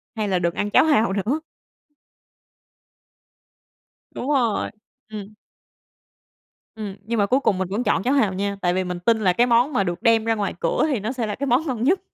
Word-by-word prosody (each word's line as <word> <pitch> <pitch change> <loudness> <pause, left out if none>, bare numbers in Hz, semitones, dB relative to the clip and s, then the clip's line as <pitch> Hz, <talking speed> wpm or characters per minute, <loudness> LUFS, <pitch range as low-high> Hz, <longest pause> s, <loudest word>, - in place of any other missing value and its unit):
"Hay 215 -2 -2
là 185 -2 +1
đừng 170 -1 0
ăn 205 - -2
cháo 205 - +5
hàu 230 -10 +3
nữa." 215 +10 -1 2.7
Đúng 260 - -5
rồi, 245 -7 +1 0.4
ừm. 210 -1 -8 1.4
Ừm, 210 -3 -6
nhưng 230 0 -1
mà 205 - +3
cuối 255 +7 +2
cùng 210 -8 +1
mình 190 0 -2
vẫn 210 +6 -2
chọn 195 - +1
cháo 260 - +1
hàu 220 -9 +2
nha, 200 +1 -2
tại 175 0 +1
vì 185 +1 0
mình 180 -1 -4
tin 220 +5 +2
là 190 -4 +2
cái 240 +6 +3
món 245 +5 +3
mà 200 - +2
được 175 -2 -4
đem 230 -2 +3
ra 225 0 +1
ngoài 205 -2 -2
cửa 165 - 0
thì 270 -8 0
nó 215 +4 -3
sẽ 250 -3 -3
là 205 - -3
cái 280 - -3
món 260 +5 +2
ngon 240 -4 -2
nhất. 360 +9 +3
220 Hz, 210 wpm, -22 LUFS, 195-245 Hz, 2.7 s, cháo